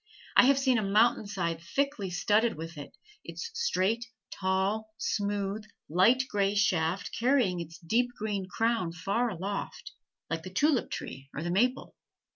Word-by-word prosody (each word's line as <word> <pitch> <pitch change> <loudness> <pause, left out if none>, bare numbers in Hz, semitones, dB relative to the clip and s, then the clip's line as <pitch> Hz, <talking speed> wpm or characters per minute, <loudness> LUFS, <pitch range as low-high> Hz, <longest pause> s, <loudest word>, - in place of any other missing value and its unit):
I - - +8
have 275 +1 +5
seen 260 -3 +3
a - - 0
mountain 215 +2 +3
side 170 -5 -2
thickly 270 - -1
studded 210 +6 +2
with 165 +2 -7
it, 145 -1 -10 0.3
its 465 - -6
straight, 235 - 0 0.2
tall, 195 +3 0
smooth, 205 -1 -1 0.3
light 205 +11 +4
gray 200 -2 +1
shaft 185 -3 +1
carrying 240 -7 +2
its 165 0 -7
deep 230 +9 +1
green 205 -3 -2
crown 225 -5 0
far 200 +8 0
aloft, 200 - -5 0.4
like 165 0 -3
the 185 - -8
tulip 270 +7 +2
tree 135 +1 -7
or 150 - -3
the 175 - -2
maple. 250 +8 +1
200 Hz, 150 wpm, -29 LUFS, 180-235 Hz, 0.4 s, I